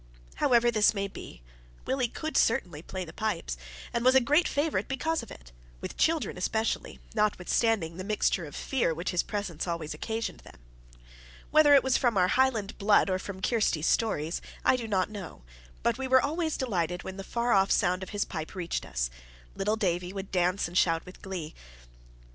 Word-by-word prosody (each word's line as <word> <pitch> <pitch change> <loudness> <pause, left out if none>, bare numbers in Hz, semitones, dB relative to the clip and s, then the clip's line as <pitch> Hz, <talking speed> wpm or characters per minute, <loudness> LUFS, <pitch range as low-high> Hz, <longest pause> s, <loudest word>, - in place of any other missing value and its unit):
However 240 -1 +4
this 215 -1 +4
may 200 0 -1
be, - - -11 0.4
Willie 260 -2 +1
could 315 +6 -5
certainly 175 -9 +2
play 185 +2 -5
the 160 - -11
pipes, 170 - -2 0.4
and 235 - 0
was 255 +1 +5
a - - +9
great 295 +7 +3
favourite 295 +2 0
because 320 +4 -1
of - - -11
it - - -12 0.3
with - - -6
children 320 - +1
especially, 220 +4 -1 0.2
notwithstanding 210 -3 +1
the 185 - -5
mixture 200 -3 0
of 145 - -10
fear 235 - 0
which 170 +3 -3
his 180 - +2
presence 195 -6 -4
always 165 -3 -3
occasioned 225 +8 -4
them. - - -15 1.0
Whether 300 -1 +7
it 275 - +6
was 265 -1 +3
from 240 -5 +1
our 180 -1 +4
Highland 235 -6 +1
blood 205 -1 +4
or 185 - 0
from 190 0 -7
Kirsty's 205 -10 +1
stories, 165 -8 0 0.2
I - - +5
do 240 -3 -4
not 195 -1 0
know, 195 - -8 0.4
but 235 +2 +1
we 265 - -2
were 260 0 +6
always 315 +3 -1
delighted 180 -8 -1
when 190 0 -7
the 195 - -5
far 235 +4 -1
off 195 -2 +4
sound 180 0 +2
of 190 - -6
his 205 -1 -1
pipes 160 0 -6
reached 175 -2 -3
us: - - -2 0.4
little 210 +3 0
Davie 180 -3 -1
would 195 -1 -6
dance 180 +1 +1
and 170 - -11
shout 165 -3 +2
with 180 - -13
glee. 180 -6 -5
200 Hz, 190 wpm, -29 LUFS, 180-240 Hz, 1.0 s, a